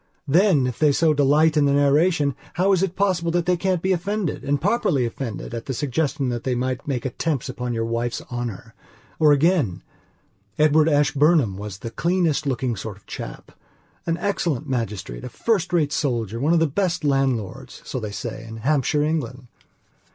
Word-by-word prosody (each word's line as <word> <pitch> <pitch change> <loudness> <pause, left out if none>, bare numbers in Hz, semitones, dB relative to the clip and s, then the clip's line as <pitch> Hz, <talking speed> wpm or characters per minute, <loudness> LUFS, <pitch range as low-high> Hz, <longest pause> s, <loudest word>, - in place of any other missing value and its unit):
Then, 165 -2 +4
if 125 -3 -3
they 150 -2 +4
so 155 +2 +3
delight 150 +2 +3
in 150 -2 +4
the 140 - +3
narration, 145 +1 +3 0.2
how 185 +3 +2
is 185 -2 +3
it 190 -2 -1
possible 185 -4 +1
that 175 -1 +1
they 180 0 +3
can 185 +1 0
be 185 +3 -1
offendedand 180 -6 -1
properly 165 - +1
offendedat 115 -1 -6
the 135 - -3
suggestion 140 0 -1
that 120 -1 -3
they 130 -2 0
might 125 +1 -2
make 130 -4 -2
attempts 135 +1 -2
upon 125 -1 -4
your 115 0 -1
wife's 115 +1 -2
honour? 120 -5 -5 0.5
Or 155 -1 +6
again: 145 - +2 0.7
Edward 155 +1 +4
Ashburnham 145 - +3
was 100 -1 -7
the 115 +4 -7
cleanest 170 -2 0
looking 130 -2 -1
sort 105 0 -7
of 100 - -24
chap; - - -8 0.6
an 165 0 +1
excellent 170 -6 -1
magistrate, 105 - -3
a - - -5
first 195 -7 0
rate 155 -4 +1
soldier, 115 -6 -1
one 150 +6 +2
of 170 - +4
the 165 - +3
best 170 +2 -1
landlords, 135 -8 -1
so - - -4
they 110 -3 -5
said, 115 +2 -6
in 110 - -7
Hampshire, 145 +4 +1
England. 130 -6 -3
145 Hz, 175 wpm, -23 LUFS, 120-165 Hz, 0.7 s, Or